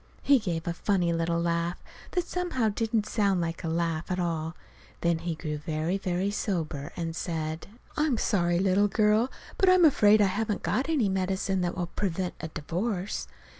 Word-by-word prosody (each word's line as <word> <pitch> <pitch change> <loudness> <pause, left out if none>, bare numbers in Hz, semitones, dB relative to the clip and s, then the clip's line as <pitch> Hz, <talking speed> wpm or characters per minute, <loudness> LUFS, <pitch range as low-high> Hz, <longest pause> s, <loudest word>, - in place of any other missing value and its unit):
He 280 -2 +5
gave 175 -6 -3
a 170 - 0
funny 175 -2 +1
little 165 0 0
laugh, 170 +1 0 0.4
that 360 -2 +1
somehow 335 -11 0
didn't 220 0 0
sound 200 -4 +1
like 165 0 -3
a - - -2
laugh 165 0 -1
at 180 0 -1
all. 165 -1 -2 0.5
Then 170 -1 +2
he 170 0 -3
grew 155 -2 -4
very, 160 +4 -1
very 185 +1 -1
sober, 160 -9 -2
and 165 -2 -3
said: 160 -2 -3 0.3
"I'm 300 -5 +1
sorry, 175 -5 +1
little 195 +2 +3
girl, 215 +4 +3 0.3
but 380 - +5
I'm 370 -2 +6
afraid 215 -8 +6
I 205 - +5
haven't 210 +2 -1
got 265 +5 0
any 280 -10 +2
medicine 190 0 0
that 175 0 -2
will 175 - 0
prevent 180 0 -2
a 160 - -3
divorce. 180 +6 -3
180 Hz, 175 wpm, -28 LUFS, 170-210 Hz, 0.5 s, I'm